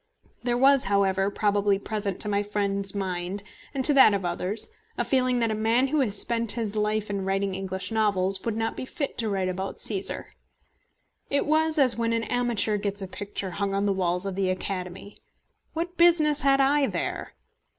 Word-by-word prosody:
There 240 0 0
was, 270 +1 +5
however, 195 -1 +2
probably 205 -1 +1
present 205 -2 -4
to - - -3
my 200 -1 +1
friend's 200 -1 -2
mind, 190 0 -3 0.3
and 265 -2 0
to 295 - +7
that 265 -7 +7
of 195 -2 -3
others, 185 - -2 0.3
a - - +1
feeling 255 -2 +1
that 230 -1 +1
a - - 0
man 225 +5 +1
who 305 +2 +1
had 250 -7 +1
spent 230 +2 +1
his 220 -3 -3
life 210 0 -1
in 200 -1 -2
writing 195 0 -1
English 190 +2 -4
novels 195 -3 +2
could 225 +2 -3
not 225 0 -2
be - - -5
fit 280 +2 -4
to 225 -2 0
write 190 -2 -1
about 190 +1 -4
Cæsar. 200 -3 -1 1.0
It 280 - +1
was 315 +1 +1
as 260 -5 +4
when 230 0 0
an 230 0 0
amateur 235 -3 0
gets 200 -1 -4
a - - -5
picture 200 0 -6
hung 200 +1 -2
on 200 +1 0
the 200 - +2
walls 180 0 -1
of 195 - -3
the 190 0 -1
Academy. 185 +1 -5 0.5
What 345 +2 -4
business 315 -4 +4
had 275 0 +3
I 275 +1 +3
there? - - -4
205 Hz, 190 wpm, -26 LUFS, 195-245 Hz, 1.0 s, to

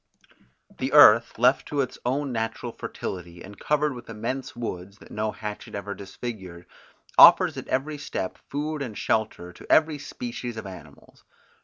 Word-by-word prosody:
The 130 +2 -2
earth 115 -6 +7
left 125 +3 +3
to 145 -1 0
its 130 - -4
own 140 +2 -1
natural 115 +1 -3
fertility 90 -5 -7
and 100 +1 -12
covered 150 -1 +1
with 120 -2 -11
immense 115 +4 -4
woods, 100 -4 -6
that - - -17
no 110 0 -2
hatchet 105 -1 -7
ever 100 0 -5
disfigured, 95 -4 -8 0.5
offers - - +8
at - - -7
every 145 +3 -2
step 95 -9 -5
food 150 +1 -3
and 115 -6 -5
shelter 105 -5 -1
to - - -9
every 155 -2 +4
species 120 -3 -6
of 110 - -6
animals. 80 -7 -13
115 Hz, 155 wpm, -25 LUFS, 100-135 Hz, 0.5 s, offers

